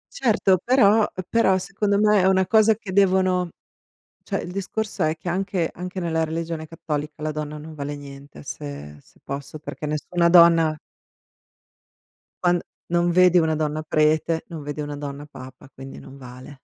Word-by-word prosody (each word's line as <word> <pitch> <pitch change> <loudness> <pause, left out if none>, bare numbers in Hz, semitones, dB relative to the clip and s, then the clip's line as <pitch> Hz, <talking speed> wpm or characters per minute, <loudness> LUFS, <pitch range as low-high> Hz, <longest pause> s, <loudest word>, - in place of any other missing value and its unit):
Certo, 205 -7 +2
però 220 -4 +4 0.2
però 190 -4 +3
secondo 195 +2 -1
me 210 -2 +4
è 185 - +3
una 190 -1 +3
cosa 220 +2 +4
che 205 -2 -9
devono 185 -2 +2 0.7
cioè - - -2
il 180 - -7
discorso 200 -1 -3
è 155 +1 0
che 175 - -11
anche 180 -1 -1
anche 180 +2 -6
nella 165 -2 0
religione 160 0 -4
cattolica 150 -1 -5
la 155 0 -2
donna 150 0 -5
non 155 +1 -10
vale 145 0 -5
niente, 140 - -12
se 70 +1 -8
se - - -26
posso, 140 +2 -7
perché 150 - -7
nessuna 170 +3 0
donna 165 -3 +6 1.6
quando 175 -1 +2 0.2
non 175 0 +1
vedi 180 0 +5
una 160 -2 +2
donna 155 0 -2
prete, 155 +1 +1
non 160 -4 -7
vedi 145 +1 -5
una 145 0 -5
donna 145 0 -6
Papa, 130 -2 -13
quindi 135 +1 -10
non 135 - -13
vale. 130 +1 -12
165 Hz, 160 wpm, -23 LUFS, 150-185 Hz, 1.6 s, donna